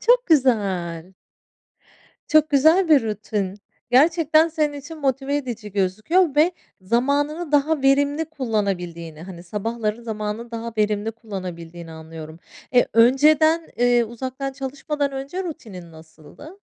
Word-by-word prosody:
çok - - +3
güzel. 190 - +1 1.2
Çok 310 0 +4
güzel 315 +6 +4
bir 295 -5 +6
rutin. 210 -3 -3 0.4
Gerçekten 315 +3 +4
senin 305 -2 -1
için 290 +3 -9
motive 270 0 -1
edici 235 -7 -5
gözüküyor 215 - +1
ve 320 +4 +4 0.3
zamanını 285 - 0
daha 295 0 +2
verimli 285 +3 +2
kullanabildiğini, 195 - -3
hani, 175 -1 -10
sabahları 215 +4 -3
zamanını 220 +1 -5
daha 230 0 -5
verimli 210 +1 0
kullanabildiğini 175 -6 -8
anlıyorum. 160 0 -10 0.4
E, 245 - +5
önceden, 305 +7 +4
eee, 245 -1 +3
uzaktan 260 +4 -5
çalışmadan 280 +1 -3
önce 275 +8 -5
rutinin 195 - -9
nasıldı? 160 - -14
245 Hz, 115 wpm, -22 LUFS, 200-295 Hz, 1.2 s, bir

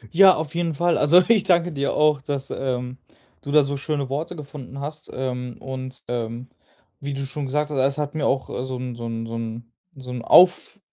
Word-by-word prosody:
Ja, 190 +1 +8
auf 155 -2 -4
jeden 170 -2 -1
Fall. 175 +3 +2
Also, 170 +5 +6
ich 220 -4 +4
danke 175 -2 +2
dir 140 -2 -1
auch, 150 -2 +3
dass, 135 0 -4
ähm, 125 -1 -3 0.4
du 140 - -9
da 150 0 +6
so 140 +1 -2
schöne 145 -1 -2
Worte 155 +6 -3
gefunden 140 -3 -9
hast, 150 +2 -6
ähm, 125 -2 -4
und, 130 -1 -7
ähm, 120 +1 -4 0.5
wie 140 0 -4
du 135 - -3
schon 140 +1 -4
gesagt 150 +3 -1
hast, 145 - -3
es 135 +2 +2
hat 145 -1 -3
mir 155 -2 0
auch, 135 0 0
äh, - - -3
so 130 -1 -4
'n 125 -1 -5
so 115 0 -6
'n 115 0 -4
so 115 - -7
'n 115 +1 -6 0.2
so 130 -2 -9
'n 125 -1 -4
Auf 180 - +5
140 Hz, 220 wpm, -23 LUFS, 125-150 Hz, 0.5 s, Ja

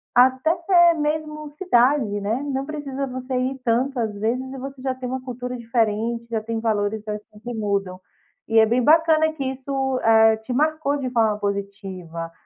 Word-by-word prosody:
até 330 +7 +4
mesmo 305 0 -2
cidade, 255 - +2
né, 220 +6 -1
não 270 0 -2
precisa 280 -2 -4
você 255 0 -5
ir 260 +1 -1
tanto, 250 +3 +1
às 220 -2 0
vezes, 230 +5 0
e 270 - -7
você 270 0 -8
já 260 -1 -2
tem 255 -1 -6
uma 260 +1 -3
cultura 250 0 -5
diferente, 230 0 -1
já 220 -1 -1
tem 225 0 -3
valores, 215 -1 -1
assim, 210 0 -7
que 245 0 -5
mudam. 200 -4 -2 0.5
E 225 - +1
é 220 - +7
bem 240 +3 +1
bacana 315 +1 +4
que 280 -3 -4
isso, 265 0 -2
eh, 220 -1 +5
te 220 +3 -9
marcou 305 0 +1
de 260 -3 -3
forma 220 -3 +2
positiva, 195 -5 -5
250 Hz, 175 wpm, -23 LUFS, 220-275 Hz, 0.5 s, é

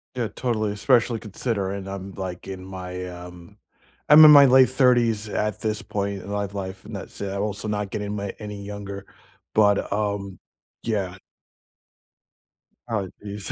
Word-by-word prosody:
Yeah, 120 -3 -1
totally, 110 -4 -2
especially 115 +1 +2
considering 100 -3 -3
I'm, 95 0 -6
like, 95 -1 -6
in 95 -1 -7
my, 90 -1 -6
um 90 +2 -11 0.5
I'm 155 +1 +10
in 150 - +10
my 140 -1 +10
late 130 0 +6
30s 120 -5 +2
at 105 0 -2
this 110 -1 -1
point 100 -2 -4
life 100 -1 -3
life 95 -1 -6
and 110 - -10
that's 100 - -8
it, 100 -1 -3
I'm 100 - -2
also 105 +1 -3
not 105 -1 -2
getting 105 0 -3
my 100 -1 -4
any 105 -1 -7
younger, 100 -1 -7 0.5
but, 100 -2 +3
um, 100 -2 -2 0.4
yeah. 100 -5 -2 1.7
Oh, 105 -4 -1 0.2
jeez. 100 -1 -4
100 Hz, 150 wpm, -24 LUFS, 95-110 Hz, 1.7 s, I'm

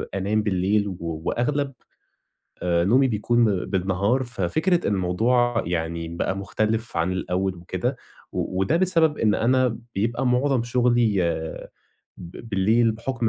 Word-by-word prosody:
أنام 105 +3 0
بالليل، 100 +1 +1
و 95 - -4 0.3
وأغلب 140 +2 -1 0.9
آآ 85 -1 +2
نومي 130 +8 +4
بيكون 120 +1 +2 0.2
بالنهار 95 +6 0
ففكرة 125 - 0
الموضوع 115 +6 +1
يعني 85 -1 -2
بقى 85 +3 -2
مختلف 110 +2 -2
عن 85 +2 +1
الأول 95 +1 -1
وكده، 95 +9 -3 0.4
و 95 - -2
وده 135 +12 +2
بسبب 165 -4 +2
إن 105 -2 +2
أنا 125 0 +2 0.2
بيبقى 115 +6 -1
معظم 125 0 +2
شغلي 120 -4 +2 1.0
ب 90 +7 -10
بالليل 110 +4 +3
بحُكم 115 +1 -2
110 Hz, 120 wpm, -24 LUFS, 95-125 Hz, 1.0 s, نومي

